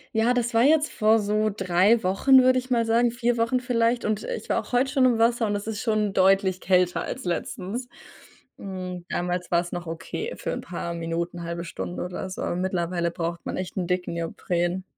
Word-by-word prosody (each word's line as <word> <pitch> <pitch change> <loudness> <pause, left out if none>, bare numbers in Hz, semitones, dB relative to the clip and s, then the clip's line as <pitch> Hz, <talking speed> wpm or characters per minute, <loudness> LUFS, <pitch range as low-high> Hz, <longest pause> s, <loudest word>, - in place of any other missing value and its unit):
Ja, 225 +3 +3
das 240 -1 -1
war 230 - +4
jetzt 305 +2 +4
vor 220 +1 +3
so 215 +1 +1
3 195 +3 +3
Wochen, 260 +8 +5
würde 255 0 +4
ich 255 - -9
mal 235 -2 +2
sagen 235 +1 +3
4 240 0 0
Wochen 230 +2 +1
vielleicht. 240 -1 +1
Und, 215 -1 -1
äh, - - -3
ich - - -11
war - - +2
auch - - -14
heute 255 +2 +2
schon 270 -3 +3
im 240 -3 +3
Wasser 230 0 +3
und 205 - -1
es 205 +1 -5
ist 220 -1 -3
schon 215 -4 0
deutlich 190 0 +3
kälter 180 -1 +2
als 260 - -5
letztens. 190 +7 -3 0.7
Hm, 185 -2 -6
damals 180 0 -2
war’s 175 0 +1
noch 175 0 -4
okay 165 - -5
für - - -4
’n - - -3
paar 170 -1 -5
Minuten, 170 +1 -3
1/2 170 0 -4
Stunde 90 - -5
oder 180 +1 -5
so, 185 - -6
aber - - -2
mittlerweile 175 -2 -1
braucht 170 0 -4
man - - -3
echt 185 +1 -5
'n 180 - 0
dicken 180 -1 -1
Neopren. 175 +2 -2
195 Hz, 210 wpm, -25 LUFS, 175-235 Hz, 0.7 s, Wochen